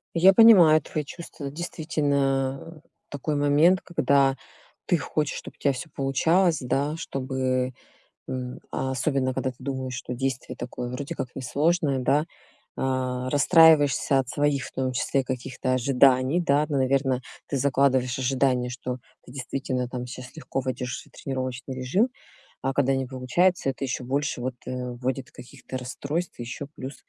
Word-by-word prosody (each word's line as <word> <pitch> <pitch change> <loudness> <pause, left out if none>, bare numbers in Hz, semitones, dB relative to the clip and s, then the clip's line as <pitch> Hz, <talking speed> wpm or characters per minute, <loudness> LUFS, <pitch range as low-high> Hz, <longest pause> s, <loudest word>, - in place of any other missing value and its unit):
Я 185 +3 +7
понимаю 185 -8 +8
твои 150 +2 -4
чувства. 145 -2 -8
Действительно, 140 -4 -1 0.2
а, - - -17 0.3
такой 145 +2 -3
момент, 145 +6 +4
когда 140 -5 +2 0.5
ты 175 - +2
хочешь, 150 -1 -2
чтоб - - -11
у - - -32
тебя 140 -2 +1
всё 155 +5 -7
получалось, 160 +6 +2
да, 140 +5 0
чтобы 130 -3 -2 0.5
м, 125 -1 -5
а 130 - -2
особенно, 130 0 0
когда 130 - -1
ты 125 - -22
думаешь, 130 -1 -4
что 125 -1 -5
действие 130 -1 -3
такое 125 0 -5
вроде 140 +5 -5
как 135 -5 -4
не 130 - -5
сложное, 145 +1 +1
да. 145 +4 +2 0.5
А, 130 -1 -1
расстраиваешься 145 -2 +5
от 130 - -1
своих, 145 -2 0
в - - -9
том 130 -1 -2
числе, 135 +2 0
каких-то 130 0 -3
ожиданий, 130 +4 +3
да- 150 -2 +2
ну, 145 - 0
наверно, 130 -1 +1 0.3
ты 140 - -1
закладываешь 130 -2 +2
ожидания, 130 -1 +1
что 125 0 -4 0.3
ты 125 - -14
действительно, 130 -1 -3
там, 125 0 -5
сейчас 125 +4 -9
легко 135 -4 -3
войдешь 125 -1 -3
в - - -7
свой - - -22
тренировочный 130 -1 -5
режим- 145 - +1 0.5
а 135 0 0
когда 135 -1 +2
не 135 0 -1
получается, 135 +7 +1
это 135 +1 -4
ещё 130 -1 -2
больше 135 0 -1
вот, 130 0 -3
э, - - -5 0.2
вводит 130 +1 -3
каких-то 130 +1 -9
расстройств. 140 +7 -4
Еще 120 +4 -5
плюс, 130 +1 -7
135 Hz, 160 wpm, -25 LUFS, 130-145 Hz, 0.5 s, понимаю